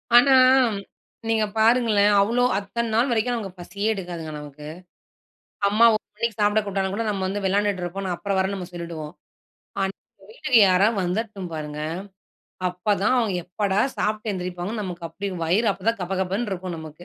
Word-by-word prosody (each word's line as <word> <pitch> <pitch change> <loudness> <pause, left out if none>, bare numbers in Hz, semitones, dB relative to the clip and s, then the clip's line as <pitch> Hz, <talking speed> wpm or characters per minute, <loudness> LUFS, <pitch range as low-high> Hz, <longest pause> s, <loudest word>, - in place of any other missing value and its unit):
ஆனா 260 +3 +7 0.9
நீங்க 225 -1 +2
பாருங்களேன். 220 -2 +4
அவ்ளோ 235 +5 +2
அத்தன 225 +3 -3
நாள் 240 +4 +3
வரைக்கும் 240 +1 +1
நமக்கு 195 -5 -6
பசியே 200 +4 -4
எடுக்காதுங்க 175 -5 -6
நமக்கு. 150 0 -10 1.0
அம்மா 215 +3 +4
1 215 - -1
மணிக்கு 230 +1 -2
சாப்பிட 210 +1 +3
கூப்புட்டா 195 -1 -1
கூட 230 +3 -1
நாம 195 -2 -1
வந்து 200 +2 -3
விளையாடிட்டு 200 0 +1
இருப்போம் 190 +2 -4
அப்புறம் 200 +2 -2
வரேன்னு 190 -1 -2
சொல்லிடுவோம். 170 -3 -6 0.7
ஆனா, 195 0 -1 0.4
வீட்டுக்கு 260 - +3
யாராவது 195 +3 +3
வந்துறட்டும் 195 0 -3
பாருங்க. 150 -1 -5 0.9
அப்பதான் 200 +5 +1
அவங்க 220 -5 0
எப்படா 195 +2 -1 0.2
சாப்ட்டு 215 +1 -1
எழுந்திரிப்பாங்கன்னு 185 +3 -4
நமக்கு 175 -3 -5
அப்டி 195 +5 -5 0.2
வயிறு 205 +8 +2
அப்பதான் 220 +3 -2
கபகபன்னு 190 +4 -2
இருக்கும் 180 -2 -4
நமக்கு. 160 +2 -10
195 Hz, 145 wpm, -24 LUFS, 180-220 Hz, 1.0 s, ஆனா